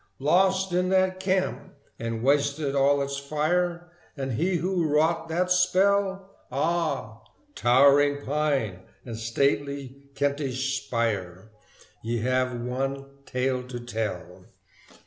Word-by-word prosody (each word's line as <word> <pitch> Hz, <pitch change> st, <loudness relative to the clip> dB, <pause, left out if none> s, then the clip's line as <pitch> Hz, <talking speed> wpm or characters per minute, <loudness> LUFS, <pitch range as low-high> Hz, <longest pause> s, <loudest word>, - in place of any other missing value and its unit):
Lost 190 Hz, +5 st, +2 dB
is 180 Hz, +1 st, +1 dB
that 185 Hz, 0 st, +2 dB
camp 185 Hz, -4 st, -1 dB, 0.2 s
and 115 Hz, 0 st, -3 dB
wasted 140 Hz, +1 st, +1 dB
all 140 Hz, +1 st, +3 dB
its 140 Hz, 0 st, -4 dB
fire: 175 Hz, +4 st, -1 dB, 0.3 s
And 135 Hz, -1 st, -3 dB
he 175 Hz, +10 st, 0 dB
who 175 Hz, -1 st, 0 dB
wrought 160 Hz, +2 st, +1 dB
that 180 Hz, +3 st, 0 dB
spell? 190 Hz, +1 st, +2 dB, 0.2 s
Ah! 150 Hz, -6 st, -1 dB, 0.3 s
towering 140 Hz, -, +4 dB
pine 140 Hz, -10 st, 0 dB, 0.3 s
and 115 Hz, -3 st, -6 dB
stately 140 Hz, +4 st, -1 dB, 0.2 s
Kentish 135 Hz, -1 st, -1 dB
spire, 105 Hz, -4 st, -2 dB, 0.5 s
Ye 115 Hz, 0 st, -2 dB
have 130 Hz, 0 st, 0 dB
one 135 Hz, +3 st, -3 dB, 0.2 s
tale 130 Hz, 0 st, -1 dB
to 125 Hz, -1 st, -6 dB
tell! 105 Hz, -7 st, -5 dB
140 Hz, 110 wpm, -26 LUFS, 125-175 Hz, 0.5 s, towering